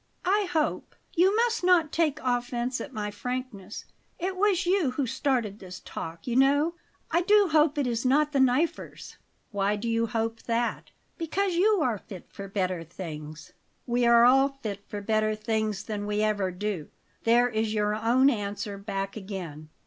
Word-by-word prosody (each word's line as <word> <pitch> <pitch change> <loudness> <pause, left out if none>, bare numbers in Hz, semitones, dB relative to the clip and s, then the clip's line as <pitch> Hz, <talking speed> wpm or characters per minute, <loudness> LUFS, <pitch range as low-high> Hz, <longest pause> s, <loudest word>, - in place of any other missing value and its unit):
"I 400 +2 +2
hope 310 -2 -1 0.2
you 375 +4 +4
must 460 -2 +1
not 350 -4 +4
take 315 -3 +1
offence 245 0 -1
at 285 - -7
my 210 -4 -4
frankness; 230 -3 -5 0.3
it 375 +2 -2
was 390 -2 +2
you 360 -5 +2
who 260 +2 -1
started 250 -5 -1
this 185 -1 -9
talk, 165 0 -7
you 240 - -2
know 285 +5 +4 0.4
I 335 +2 +3
do 410 +1 +4
hope 305 -1 +3
it 285 - +1
is 235 -1 -1
not 295 +4 +3
the 280 - +1
'Knifers.'" 265 +6 0 0.3
"Why 200 0 +1
do 210 +3 -4
you 230 0 +1
hope 225 +1 -2
that?" 235 0 -1 0.3
"Because 370 +4 0
you 395 +2 +3
are 230 -5 0
fit 185 -2 -11
for 200 -1 -8
better 185 -3 -2
things." 155 -3 -8 0.3
"We 240 -1 +1
are 235 0 +7
all 270 +2 +5
fit 225 -8 -6
for 205 - -5
better 215 +1 +1
things 215 -2 -2
than 205 -1 -4
we 210 0 0
ever 205 -3 +1
do. 185 -3 -4 0.4
There 240 +2 +4
is 220 -1 -1
your 210 0 +1
own 235 +5 +3
answer 205 -2 -4
back 195 -1 -4
again. 180 -7 -7
235 Hz, 170 wpm, -27 LUFS, 205-290 Hz, 0.4 s, are